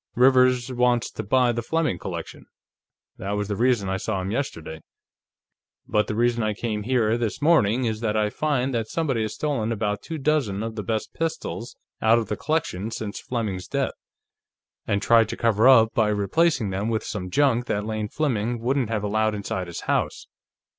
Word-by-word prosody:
"Rivers 125 0 +4
wants 125 -1 +1
to - - -5
buy 125 +3 +3
the 120 0 -2
Fleming 155 - -1
collection. - - -7 0.7
That 100 +2 -3
was 105 0 -2
the 105 - -1
reason 120 -3 +2
I 95 0 -1
saw 95 0 -2
him 95 +1 -3
yesterday. 80 - -4 1.1
But 105 0 +1
the 105 - -3
reason 120 +1 +2
I 110 -1 0
came 110 -1 -3
here, 115 -1 +1
this 115 -3 -2
morning, 130 -7 +3
is 110 -2 -1
that 110 -1 -1
I 105 -1 +1
find 135 -2 0
that 115 -2 -1
somebody 140 -7 -1
has 110 -1 -3
stolen 135 -7 -1
about 105 -2 -1
two 165 - -6
dozen 135 -9 0
of 115 0 -4
the 110 - -4
best 110 +2 -3
pistols 160 -7 -4 0.3
out 110 +1 +5
of 115 -3 -2
the 105 - -1
collection 140 - -2
since 110 -2 -5
Fleming's 105 -7 -3
death, - - -1 0.9
and 100 0 0
tried 115 -2 +5
to - - -4
cover 115 0 +3
up 115 -4 +6
by 110 -2 +2
replacing 105 - +1
them 100 +4 -2
with 110 -1 -1
some 90 -4 -5
junk 125 0 +2
that 105 0 -1
Lane 110 -1 -2
Fleming 120 -6 -1
wouldn't 125 0 0
have 110 -2 -1
allowed 110 +1 +1
inside 95 -3 -3
his 85 - -6
house. - - -1
115 Hz, 190 wpm, -24 LUFS, 105-125 Hz, 1.1 s, up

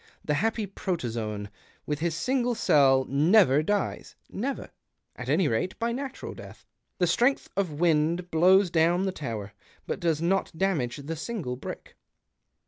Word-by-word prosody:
The 150 - +1
happy 220 +6 0
protozoan, 115 - -3 0.4
with 150 -1 -2
his 165 0 -1
single 245 +6 0
cell, 135 -10 +4
never 150 +1 +4
dies 205 +5 -2
— - - -44
never, 265 +7 -4 0.4
at - - -7
any 185 - +3
rate, 130 +10 -1
by 230 +1 -1
natural 265 +2 -5
death. - - -12 0.3
The 180 - +2
strength 245 +10 +1
of 175 -7 -2
wind 170 +1 +1
blows 185 +3 +5
down 175 +3 +3
the 190 - 0
tower, 110 - -6 0.3
but - - -3
does 165 -4 +1
not 175 0 0
damage 160 -11 0
the 145 +3 -5
single 160 - -4
brick." 125 - -8
170 Hz, 150 wpm, -27 LUFS, 145-195 Hz, 0.4 s, blows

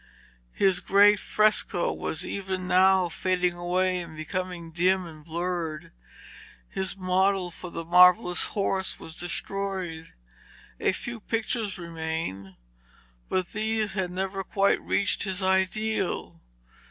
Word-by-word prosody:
His 190 -2 +3
great 205 +2 +5
fresco 215 -4 +2
was 160 +4 -3
even 190 -2 -4
now 185 0 +4
fading 180 +1 0
away 180 +1 0
and 165 -3 -8
becoming 180 0 -4
dim 180 +2 +2
and 155 -2 -11
blurred. 170 -1 -4 0.8
His 190 - -3
model 185 0 +1
for 180 +1 -8
the 165 -1 -6
marvellous 180 +1 +5
horse 190 -1 0
was 160 - -8
destroyed. 180 -1 -3 0.7
A - - +2
few 235 +5 -6
pictures 220 -2 -2
remained, 160 - -5 0.7
but 185 -2 -1
these 215 -1 -1
had 190 -2 -1
never 190 +2 -3
quite 195 +1 +1
reached 200 - 0
his 190 -1 -1
ideal. 190 - 0
185 Hz, 115 wpm, -27 LUFS, 175-195 Hz, 0.8 s, great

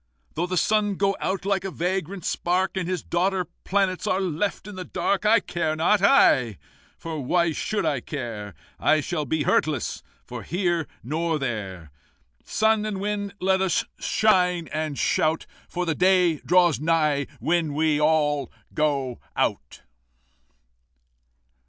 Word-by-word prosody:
"Though 175 +3 -1
the 185 0 -2
sun 205 +2 +2
go 195 +1 +1
out 190 0 -2
like 195 -2 0
a 195 - -3
vagrant 185 0 -3
spark, 185 +2 0
And 185 -2 -2
his 185 -4 -2
daughter 185 +1 0 0.2
planets 190 -2 0
are 185 - +1
left 190 +2 -2
in 210 - -8
the 185 - -5
dark, 200 +3 -1
I 225 +2 +6
care 160 -3 -2
not, 185 +6 +2
I! 130 - +4 0.4
For 160 -3 -5
why 170 +5 +2
should 205 +5 -2
I 145 -4 +1
care? 115 -7 -6 0.2
I 155 - +3
shall 155 0 -2
be 155 +2 0
hurtless, 145 -4 0 0.3
nor - - -6
here 175 -3 -1 0.2
nor 160 +5 -1
there. 100 - -5 0.5
Sun 220 -1 +2
and 210 -3 -3
Wind, 205 0 -3
let 190 0 +2
us 190 -3 +1
shine 180 -5 +2
and 155 -2 -2
shout, 160 +1 +1 0.2
For 180 0 -2
the 165 - 0
day 180 -2 +3
draws 175 0 +3
nigh 150 -3 +1
when 165 -3 0
we 155 -1 +2
all 145 -3 +2 0.2
go 140 -5 0 0.2
out!" - - -2
170 Hz, 145 wpm, -24 LUFS, 150-190 Hz, 0.5 s, I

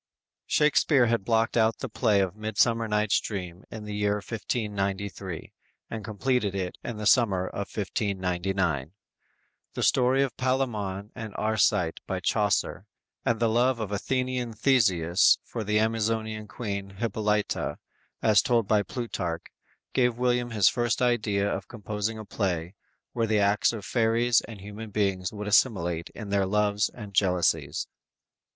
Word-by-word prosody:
"_ - - -66 0.4
Shakspere 150 -3 +4
had 115 -3 +1
blocked 115 +1 +1
out 110 -1 +3
the 135 - -4
play 110 -3 +2
of 95 0 -1
"Midsummer 110 +2 +1
Night's 105 -1 +2
Dream" 90 -3 -6
in 110 -1 -7
the 105 0 -6
year 105 0 +1
1593, 100 -4 -3 0.4
and 110 -1 -5
completed 110 -1 -1
it 90 -2 -3
in 120 - -5
the 105 - -5
summer 100 -5 +4
of 100 +1 -4
1599. 95 - -1 0.8
The - - -2
story 130 +2 +4
of 135 - -3
Palamon 110 -7 -1
and 110 -3 -7
Arcite 105 -6 +1
by 95 - -2
Chaucer, 105 +2 0 0.4
and 115 -1 +1
the 115 - +3
love 120 +2 +2
of 105 -2 -4
Athenian 125 +2 -1
Theseus 95 -9 +4
for 115 - -5
the 105 +1 +1
Amazonian 110 0 0
Queen 100 -4 -5
Hippolyta, 105 -1 -1 0.5
as 105 -2 +5
told 115 -4 +1
by 105 -1 +3
Plutarch, 90 -8 -4 0.5
gave 125 -2 +2
William 125 -1 +1
his 105 -5 +3
first 120 0 +1
idea 105 -5 +1
of 95 -1 -3
composing 110 -1 -4
a 110 - -7
play 90 -4 -2 0.4
where 115 -2 0
the 110 0 +2
acts 100 0 +3
of 110 -4 -7
fairies 115 0 +3
and 110 -4 -10
human 105 +2 -8
beings 95 -3 0
would 105 -1 -6
assimilate 90 -7 +2
in 105 -3 -7
their 100 -1 +1
loves 105 +1 +1
and 105 -4 -10
jealousies. 90 -2 +1
105 Hz, 145 wpm, -27 LUFS, 100-115 Hz, 0.8 s, as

